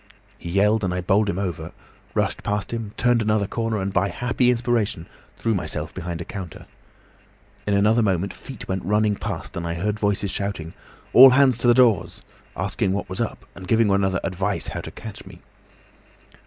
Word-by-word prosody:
He 85 - -7
yelled 105 +4 +2
and 90 - 0
I 90 0 -2
bowled 100 +4 +2
him 90 - -2
over, 85 -4 -4 0.4
rushed - - 0
past 105 -1 -2
him, 115 -3 -4
turned 120 -1 +3
another 105 -1 +1
corner, 115 +1 -2
and 95 0 -3
by 95 +1 +2
a - - -6
happy 125 +4 +1
inspiration 115 -7 0 0.3
threw 115 - 0
myself 95 - -3
behind 85 0 -5
a - - -6
counter. 95 -6 -8 1.0
In 100 - +2
another 105 +4 +4
moment 95 -2 0
feet 130 -6 -10
went 95 -1 -2
running 105 +2 +2
past - - -5
and 85 0 -3
I 85 - -2
heard 105 +5 -2
voices 100 -2 0
shouting, 100 -5 -4 0.4
'All 130 +2 +11
hands 130 -2 +4
to 120 - +1
the 120 - +6
doors!' 115 -9 +2 0.3
asking 95 - -1
what 100 - -3
was 95 +4 -3
'up,' 115 - -4
and 95 -1 -10
giving 115 0 +3
one 100 0 +3
another 95 -2 +1
advice 95 -2 -1
how - - -5
to - - -7
catch - - -9
me. - - -12
100 Hz, 195 wpm, -23 LUFS, 95-115 Hz, 1.0 s, All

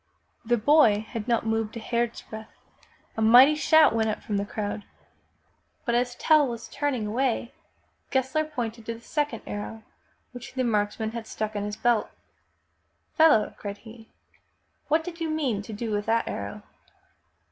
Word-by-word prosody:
The 240 +1 +2
boy 225 -4 +5
had 225 -2 -6
not 235 -2 +1
moved 225 0 -1
a - - -4
hairsbreadth! 230 -1 -3 0.7
A 220 - -3
mighty 245 +6 +8
shout 315 -1 +5
went 220 -1 +1
up 215 - -4
from 205 - -2
the 200 0 -2
crowd! 205 0 -4 1.0
But 235 - 0
as 245 +1 +1
Tell 305 -3 +4
was 235 -2 -6
turn 285 -1 -1
ing 220 -4 -3
away, 235 +2 -1 0.6
Gessler 265 +4 +1
pointed 235 -7 -5
to 230 - -3
the 230 - -14
second 290 -2 -2
arrow 220 +2 -6 0.5
which 250 +1 -10
the 260 - 0
marks 210 -3 0
man 220 0 -2
had 230 -1 -6
stuck 215 0 -4
in 205 0 -2
his 210 0 -4
belt. 240 -2 +1 0.6
" - - -46
Fellow,'' 315 -10 +5
cried 200 -1 -5
he, 225 +1 -14 0.8
''what 315 +2 +3
did 345 -1 -8
you 325 - -1
mean 275 -10 -1
to 215 - -9
do 220 +1 -4
with 205 0 -2
that 230 +1 +1
arrow?" - - -5
230 Hz, 170 wpm, -26 LUFS, 220-265 Hz, 1.0 s, mighty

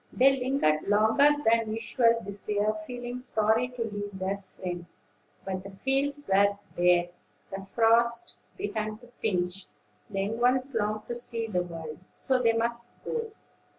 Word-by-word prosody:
They 270 +1 +4
lingered 250 - +2
longer 220 +8 +5 0.2
than 225 -1 +3
usual 230 +1 +2
this 200 +1 -8
year, 210 +1 +2
feeling 245 0 -5
sorry 220 -1 +2
to 250 -2 -4
leave 205 -2 -5
their 195 +1 -2
friend. 175 -2 -5 0.6
But 190 -1 -3
the 195 - -8
fields 275 +8 -1
were 200 +1 +4 0.2
bare, 175 0 +4 0.5
the 195 - -6
frosts 235 - +2 0.2
began 215 - -3
to 245 +2 -16
pinch, 180 -2 -1 0.4
and 200 - -6
the - - +2
young 215 +4 -2
ones 255 +2 +2
longed 215 -1 -1
to 240 - -3
see 235 -1 -4
the 185 -5 0
world; 165 -3 -7 0.2
so 260 -1 +1
they 230 -2 +4
must 235 +1 -1 0.2
go. 460 -1 -2
220 Hz, 155 wpm, -28 LUFS, 195-245 Hz, 0.6 s, longer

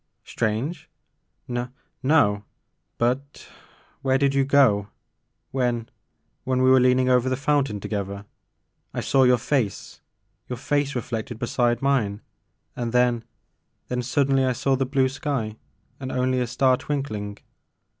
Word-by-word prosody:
"Strange? 115 +10 -2 0.6
N 120 0 -3
— - - -47
no 105 -9 +3 0.3
— 85 +1 -51
^but— 130 +4 -1 0.5
where 135 -1 +2
did 140 0 +2
you 135 0 +3
go 130 -8 +4 0.6
when 120 -3 -1 0.3
— - - -38
^when 130 0 +2
we 130 - +5
were 130 - +7
leaning 125 0 +3
over 125 0 +3
the 130 - +1
fountain 140 -6 +1
together? 100 0 -4 0.7
I - - -1
saw 135 - +2
your 125 0 +5
face, 120 -4 -2 0.2
— - - -45
^your 125 - -3
face 145 +2 0
reflected 120 -1 -4
beside 120 +1 0
mine 115 -7 +1 0.5
and 120 -1 -3
then 120 -2 +2 0.3
— - - -49
then 125 0 -1
suddenly 135 +1 +2
I 130 -1 +2
saw 135 +2 +1
the 130 0 -1
blue 135 -1 +2
sky 130 -6 -3 0.4
and 130 -1 -5
only 130 0 +1
a 125 - 0
star 130 +2 +3
twinkling." 110 -9 -4
125 Hz, 150 wpm, -24 LUFS, 115-135 Hz, 0.7 s, were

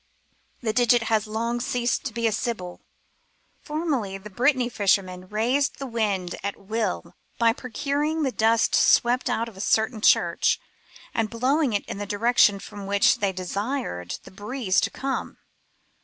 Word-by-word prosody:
The 220 -3 -1
digit 240 0 +4
has 215 0 +2
long 230 +3 -2
ceased 245 -1 -1
to 265 - -2
be 235 -1 -2
a 225 - +3
sybil. 210 -5 -4 0.8
Formerly 295 - -2
the 205 +2 -11
Brittany 250 +3 +2
fishermen 190 -5 0
raised 245 +7 +1
the 275 - -5
wind 205 -7 -1
at 200 +1 -3
wiU 200 -4 -3 0.2
by 230 -1 +4
procuring 285 +6 -2
the 265 - +1
dust 225 0 +2
swept 245 +2 +4
out 230 -1 0
of 230 - -11
a 190 - -7
certain 220 +1 +1
church, - - +3 0.5
and 225 -1 0
blowing 260 +3 +1
it 205 - -1
in - - -6
the 205 - -4
direction 210 -1 +3
from 200 0 -9
which 200 +4 +3
they 200 -1 +1
desired 185 - -3
the - - -13
breeze 205 0 -1
to 220 - 0
come. 270 +3 -4
225 Hz, 155 wpm, -25 LUFS, 200-250 Hz, 0.8 s, digit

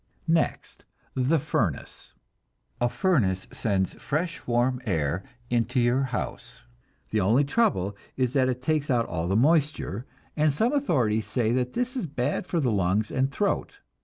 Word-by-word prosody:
Next, 165 - -1 0.3
the 130 +5 +2
furnace. 115 - -3 0.7
A 120 - +3
furnace 120 - +1
sends 95 -4 0
fresh 165 +2 -3
warm 125 +1 +1
air 80 -1 0 0.3
into 120 +1 +1
your 125 +3 +2
house; 125 - -5 0.5
the 110 - +2
only 115 +9 +4
trouble 140 - +1 0.2
is 130 -1 +1
that 130 -2 +3
it 125 0 -3
takes 150 0 0
out 120 -3 +2
all 85 -5 -3
the 95 - +1
moisture, 145 - +1 0.3
and 155 0 +3
some 225 - +1
authorities 120 - +1
say 115 0 0
that 125 0 0
this 250 +1 -1
is 245 -10 -2
bad 140 +4 -2
for 175 - 0
the 130 -6 +1
lungs 100 +2 +1
and 135 +1 +1
throat. 200 +8 -1
125 Hz, 155 wpm, -26 LUFS, 110-150 Hz, 0.7 s, only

